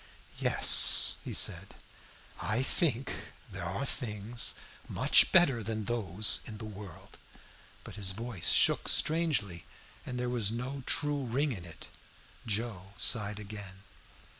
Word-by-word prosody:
"Yes," - - +5
he - - -7
said, - - +3 0.7
"I 110 +5 0
think 135 -4 0 0.4
there 95 -2 -7
are 95 +10 -3
things 115 -2 -1 0.3
much - - +3
better 140 -10 +4
than 110 0 -5
those 105 -3 +1
in 110 - -7
the 110 - -9
world." 100 -4 -12 0.6
But - - -11
his 100 -3 0
voice 110 -2 -4
shook - - +3
strangely, 150 - 0 0.4
and 125 -1 -6
there 125 - -3
was 120 -5 -1
no 125 +4 -5
true 145 -2 0
ring 135 +5 -1
in 90 -8 -7
it. 85 -1 -11 0.6
Joe 105 -3 -4
sighed 105 -3 +2
again. 100 -2 -10
110 Hz, 130 wpm, -30 LUFS, 100-125 Hz, 0.7 s, Yes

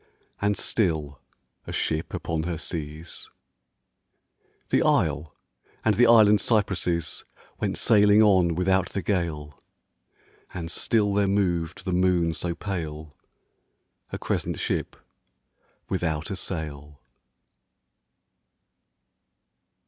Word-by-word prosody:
And 100 0 +1
still, 75 - -1 0.5
a - - -5
ship 80 0 -1
upon 80 -1 -2
her 85 0 -3
seas. 80 0 -6 1.4
The - - +3
isle 75 0 +1 0.5
and 110 - +4
the 120 +4 +4
island 105 -3 +6
cypresses 95 -6 0 0.4
Went - - -1
sailing 105 -1 +5
on 90 -5 +4
without 95 +1 +1
the 100 - -4
gale: 80 -7 -2 0.9
And 85 -2 -4
still 105 +2 +1
there 100 0 +2
moved 90 -4 0
the 95 - -1
moon 90 -2 +2
so 85 +1 -3
pale, 80 -7 -5 1.0
A - - -3
crescent - - -2
ship - - -2 0.9
without 80 -3 -2
a - - -2
sail 75 -6 -6
90 Hz, 100 wpm, -25 LUFS, 80-100 Hz, 1.4 s, island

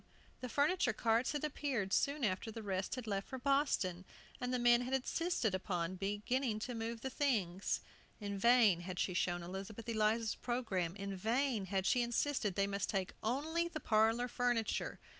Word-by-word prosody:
The 250 - -5
furniture 285 0 +2
carts 230 +4 +1
had 295 - -2
appeared 265 -9 -1
soon 280 0 +1
after 205 +1 0
the 225 0 -7
rest 190 +1 -2
had 255 -3 -6
left 200 -2 -2
for 260 - -5
Boston, 260 - +1 0.4
and 250 0 -2
the 250 - +1
men 240 0 +5
had 255 +2 0
insisted 265 - 0
upon 185 -2 -2
beginning 210 +5 -1
to 245 - -3
move 225 0 -4
the 265 - -3
things. 200 - 0 0.4
In 200 -2 -4
vain 220 -3 +5
had 180 +1 -6
she 185 - 0
shown 175 0 0
Elizabeth 195 +5 -7
Eliza's 220 0 +1
programme; 195 -9 -2
in 200 -1 -4
vain 230 +2 0
had 190 0 0
she 245 - +3
insisted 240 -4 0
they 195 - +2
must 200 0 -2
take 190 -2 -1
only 315 +9 0
the 340 -2 -5
parlor 225 0 +3
furniture. 240 -2 0
225 Hz, 175 wpm, -36 LUFS, 195-255 Hz, 0.4 s, men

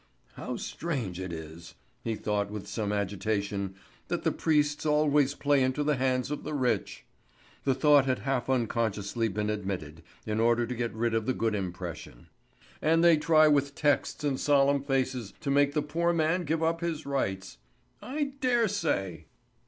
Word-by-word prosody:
"How - - -5
strange 125 - -4
it 95 -1 -5
is," 80 +1 -9 0.3
he 115 -1 -1
thought 105 -1 -1
with 105 -1 -6
some 105 -3 -3
agitation, 100 -1 -2 0.3
"that - - -2
the - - +2
priests 150 -2 +1
always 150 -2 +3
play 145 -1 +2
into 130 +3 +1
the 150 0 +2
hands 130 0 0
of 150 - -3
the 150 0 -4
rich!" 130 -3 -1 0.6
The 135 -2 +2
thought 145 -2 +5
had 130 -1 +1
half 130 +2 -2
unconsciously 115 -3 0
been 105 +1 -2
admitted, 95 -7 -4 0.2
in 110 0 -1
order 120 +1 +3
to 125 - -4
get 120 -1 -2
rid 115 +1 0
of 115 -1 0
the 130 - +1
good 115 -1 0
impression. 90 -9 -6 0.5
"And 165 +2 +3
they 170 -1 +7
try 155 0 +5
with 140 -1 +2
texts 145 0 0
and 140 -3 0
solemn 140 -1 +3
faces 130 -5 -1
to 140 - -2
make 145 0 +3
the 150 - +1
poor 170 +3 0
man 165 +2 +1
give 160 +2 0
up 165 +1 0
his 165 -2 -3
rights. 95 - -3 0.4
I 280 +1 -3
dare 240 -3 +2
say!" 95 - -2
130 Hz, 170 wpm, -29 LUFS, 105-150 Hz, 0.6 s, they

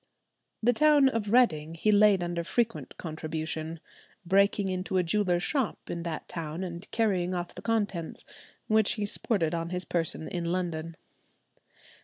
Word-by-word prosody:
The 245 +2 +4
town 295 0 +5
of 220 -5 -2
Reading 165 -11 +3
he 215 +6 +2
laid 205 -3 +5
under 175 0 -2
frequent 230 +6 -2
contribution, 160 0 -4 0.5
breaking 200 +2 +3
into 185 0 -2
a 180 - +3
jeweller's 175 0 +1
shop 270 -4 -2
in 170 - -4
that 165 -2 -5
town 165 +1 -5
and 175 +1 -7
carrying 185 -5 0
off 175 0 -4
the - - -9
contents, 205 -7 -2 0.4
which 220 -1 +3
he 210 - -2
sported 200 -6 +1
on 165 0 -2
his 180 +1 +3
person 165 -2 0
in 175 -2 -3
London. 170 -2 -2
180 Hz, 150 wpm, -28 LUFS, 165-210 Hz, 0.5 s, town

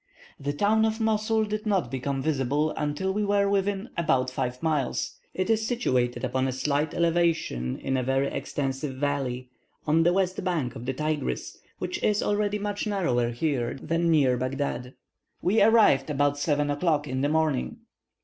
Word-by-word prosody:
The 140 +1 -2
town 205 +8 +2
of 220 0 0
Mosul 220 0 +1
did 215 +1 -4
not 195 -4 +1
become 135 +1 -2
visible 145 +1 +1
until 150 +6 -2
we 210 +1 0
were 200 0 +2
within 200 +2 0
about 130 -7 +1
five 125 +1 -3
miles. 150 -6 -1 0.2
It 185 - -1
is 220 0 +1
situated 125 - 0
upon 130 +1 0
a - - -1
slight 145 +3 -1
elevation 165 - +1
in 135 - -2
a 130 - +1
very 135 +2 +1
extensive 135 0 -3
valley, 130 -3 -2 0.3
on 155 +2 +3
the 170 +1 +4
west 185 0 0
bank 165 -9 -1
of 120 +2 -8
the 135 - 0
Tigris, 150 +2 -3 0.2
which 350 - -4
is 210 -1 +2
already 205 0 0
much 205 +1 -3
narrower 130 - +1
here 120 -1 -1
than 165 +4 -1
near 140 -6 +4
Baghdad. 130 -1 -3 0.4
We 210 +5 +2
arrived 215 - +5
about 145 0 +1
7 145 -1 +1
o'clock 150 0 +1
in 130 0 -2
the 145 - +1
morning. 160 - 0
150 Hz, 170 wpm, -26 LUFS, 135-195 Hz, 0.4 s, arrived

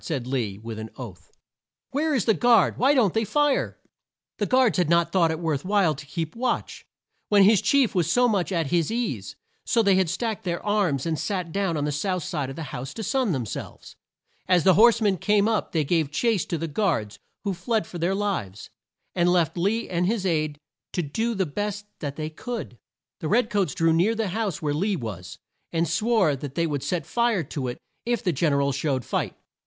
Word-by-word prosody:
said 140 -7 -3
Lee 120 -7 -2
with 110 +1 -7
an 110 0 -6
oath. 115 -8 -10 0.6
"Where 300 +2 +1
is 230 - +1
the 220 - +4
guard? 235 -3 +3
Why 275 +4 +4
don't 220 -9 +3
they 225 - +1
fire?" 295 +5 +1 0.6
The 205 - 0
guards 250 - +3
had 175 -4 +2
not 170 0 +3
thought 170 -3 +3
it 160 0 -2
worth 155 -5 -1
while 195 -4 +2
to 145 +1 -10
keep 160 +3 -4
watch, 250 +2 -2 0.4
when 200 -2 +6
their 215 +3 +6
chief 270 +4 +3
was 175 -3 +1
so 245 +4 +4
much 200 -5 0
at 165 -5 -1
his 170 -3 +2
ease, 160 - -3 0.3
so 230 - +2
they 195 -2 +4
had 190 -3 +2
stacked 220 +4 -2
their 175 -2 -3
arms 195 -10 +1
and 160 -2 -1
sat 180 -5 -2
down 195 -3 0
on 145 - -1
the 150 - -1
south 180 +5 -1
side 155 -7 -3
of 135 - -8
a 165 - -4
house 130 +2 -6
to 225 - -5
sun 235 +1 +1
them 130 -7 -1
selves. 105 - -8 0.5
As 180 -3 +4
the 190 - +6
horse 230 +4 +6
men 200 -3 +2
came 210 0 +3
up 220 -2 0
they 160 -2 +1
gave 160 0 +1
chase 210 +5 +1
to 170 - -2
the 165 +1 -3
guards 145 - -1 0.2
who 200 -2 -1
fled 220 +1 -1
for 175 - -8
their 175 +4 +1
lives, 190 - -3 0.4
and 175 0 +2
left 175 -4 +2
Lee 205 +6 0
and 180 0 0
his 210 -2 -1
aide 155 -4 0 0.4
to 180 - 0
do 220 +11 -2
the 190 -2 +1
best 205 +6 -4
that 145 -2 -4
they 155 +1 -4
could. 215 - -6 0.4
The 155 - -3
red 220 +5 +2
coats 195 -9 0
drew 165 0 +3
near 185 +8 +2
the 220 -3 -1
house 200 -4 -2
where 145 -1 0
Lee 195 +7 0
was, 95 - -6 0.3
and 165 0 +1
swore 200 -3 +2
that 140 0 -7
they 170 - +1
would 145 -4 -2
set 160 +2 -2
fire 235 -6 +1
to 135 -2 -4
it 120 - -4 0.3
if 240 -1 -1
the 180 - +1
Gen 155 +2 +1
er 140 0 +2
al 140 - +1
showed 135 -2 -1
fight. - - -2
180 Hz, 220 wpm, -25 LUFS, 150-210 Hz, 0.6 s, when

